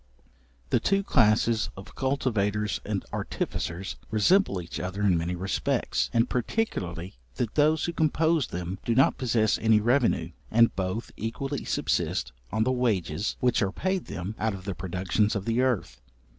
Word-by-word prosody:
The 120 - +4
two 195 - +1
classes 115 - +3
of 95 - -10
cultivators 105 -7 0
and - - -3
artificers, 90 +3 -3
resemble 110 - +3
each 85 -1 -6
other 95 +3 -3
in 95 -3 +4
many 85 +2 -1
respects, 95 +2 -1
and 115 +1 +3
particularly 95 - -2 0.2
that 115 - -2
those 155 +1 +3
who 170 - -2
compose 160 -1 +2
them 90 +2 -5
do 115 - 0
not 130 -1 +4
possess 115 -5 +2
any 110 -1 +4
revenue, 120 +4 +2 0.2
and 115 +1 +4
both 95 +4 -3
equally 135 +5 -3
subsist - - 0 0.2
on 110 +2 +1
the 130 - +1
wages 105 -7 0
which 125 -2 +2
are 100 -2 +1
paid 190 - -1
them 90 +4 -5
out 110 -2 0
of 95 -1 -10
the 100 - -2
productions 95 +4 0
of 100 -1 -3
the 115 +2 +1
earth. 130 -6 -1
110 Hz, 155 wpm, -27 LUFS, 95-130 Hz, 0.2 s, The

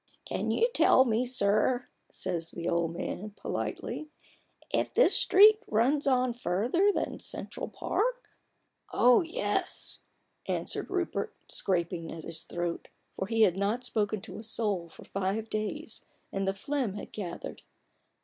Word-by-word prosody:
" - - -42
Can - - -2
you 465 - +3
tell 260 - +6
me, 235 +1 +1
sir," 245 +1 +2 0.2
says 170 -3 -3
the 170 - -5
old 170 -1 +1
man, 205 +3 -5
politely, - - -3
li 305 - -7 0.6
if - - +1
this - - +6
street 425 +2 +7
runs 265 +7 +2
on 255 -2 +3
further 245 - +2
than - - -2
Central - - -5
Park?" - - -1 0.6
"Oh, 245 0 +6
yes/' 330 -1 -2 0.5
answered - - -2
Rupert, 370 -2 -2
scraping 170 -3 -1
at 165 -1 -7
his 165 0 -3
throat; 175 -1 -3 0.3
for 190 - -3
he 225 0 +3
had 190 -3 +4
not 210 +5 0
spoken 210 -3 0
to 200 -1 -8
a - - -8
soul 210 -6 -1
for - - -14
five 200 +3 -2
days, 215 +1 -3 0.3
and 195 0 -1
the 195 - +1
phlegm 255 -2 -2
had 205 - -8
gathered. 180 -5 -6
215 Hz, 150 wpm, -30 LUFS, 185-255 Hz, 0.6 s, street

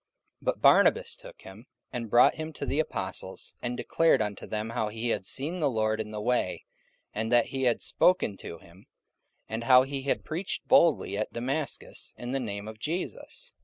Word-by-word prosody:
44:009:027 - - -19
But - - 0
Barnabas - - +5
took - - -14
him, 105 +7 -12 0.3
and 120 -3 -4
brought 120 - +6
him 160 0 -6
to - - -5
the 145 - -1
apostles, 95 -9 -4
and 120 0 -3
declared 165 0 +3
unto 105 -2 -3
them 110 +1 -3
how 110 -1 -1
he 115 +2 -3
had 95 - -1
seen 160 +7 -1
the 150 -4 +2
Lord 110 -2 0
in 105 - -6
the 105 0 -5
way, 105 -7 -1 0.5
and 110 +2 -2
that 120 -1 +5
he 135 -1 -2
had 120 -2 +1
spoken 180 - +2
to 85 - -8
him, 85 +4 -19 0.6
and 115 +1 -4
how 130 0 +7
he 135 0 -4
had 140 - -1
preached 175 +5 -4
boldly 140 - +4
at 110 - -3
Damascus 135 +5 -3
in 120 0 -5
the 135 - 0
name 100 -4 -5
of 110 0 -9
Jesus. 185 - -5
120 Hz, 195 wpm, -28 LUFS, 105-140 Hz, 0.6 s, how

